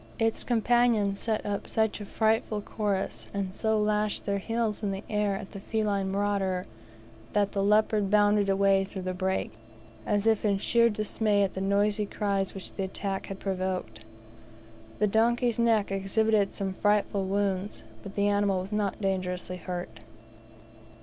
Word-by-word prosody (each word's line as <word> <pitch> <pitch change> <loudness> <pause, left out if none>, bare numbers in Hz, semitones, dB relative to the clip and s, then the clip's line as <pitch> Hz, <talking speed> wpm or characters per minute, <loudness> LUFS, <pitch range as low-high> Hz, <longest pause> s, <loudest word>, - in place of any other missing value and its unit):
Its 225 -1 +1
companions 235 -4 +2
set 220 -2 -1
up 205 -1 -3
such 220 -1 0
a - - -5
frightful 220 0 +1
chorus, 205 -2 -3
and 195 -2 -2
so 220 +1 +1
lashed 210 0 0
their 200 0 0
heels 225 0 -1
in 205 - -1
the 195 +1 -4
air 210 -1 +1
at 195 0 -7
the 200 - -7
feline 200 -2 -1
marauder, 195 -2 0 0.7
that 205 -1 +2
the 195 - -1
leopard 210 0 +3
bounded 205 -1 +4
away 195 0 +3
through 190 -1 -7
the 185 0 -2
brake, 190 +1 -1 0.5
as 205 0 0
if 220 -2 +3
in 200 -2 +2
sheer 235 +3 +3
dismay 210 -1 +1
at 195 - -1
the 190 - -4
noisy 205 +1 +1
cries 200 -2 -1
which 190 - -8
the 195 - -3
attack 195 0 -4
had 195 -1 -6
provoked. 185 - -3 0.9
The - - +2
donkey's 235 +3 +2
neck 225 -4 +2
exhibited 200 +1 +1
some 195 -2 -2
frightful 205 -1 +1
wounds, 195 0 -1 0.2
but 200 -2 -9
the 200 0 +2
animal 205 -2 +2
was 190 +3 -8
not 205 -2 -1
dangerously 180 -2 -2
hurt. 180 0 -6
200 Hz, 160 wpm, -28 LUFS, 195-215 Hz, 0.9 s, bounded